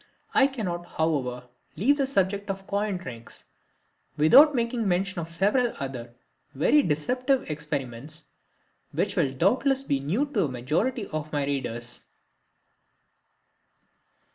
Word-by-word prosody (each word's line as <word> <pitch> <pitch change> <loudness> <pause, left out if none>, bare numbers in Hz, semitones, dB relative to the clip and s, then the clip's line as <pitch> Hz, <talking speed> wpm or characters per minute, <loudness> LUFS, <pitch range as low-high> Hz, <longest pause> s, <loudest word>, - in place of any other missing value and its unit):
I 275 - +6
cannot, 180 -10 -4
however, 135 -6 0 0.3
leave 280 +9 +3
the 275 -2 +1
subject 200 -4 0
of 195 0 -4
coin 200 -1 -1
tricks 120 -9 -10 0.7
without 275 - +7
making 235 -2 0
mention 190 0 0
of 165 - -7
several 210 +8 +1
other 125 -3 -6 0.4
very 225 - +4
deceptive 250 - 0
experiments, 145 0 -5 0.7
which - - -1
will 135 - +2
doubtless 260 - +2
be 140 - 0
new 175 - 0
to 290 - -3
the - - +2
majority 155 - -1
of 155 0 -4
my 145 -2 0
readers. 120 -3 -4
175 Hz, 120 wpm, -26 LUFS, -, 0.7 s, without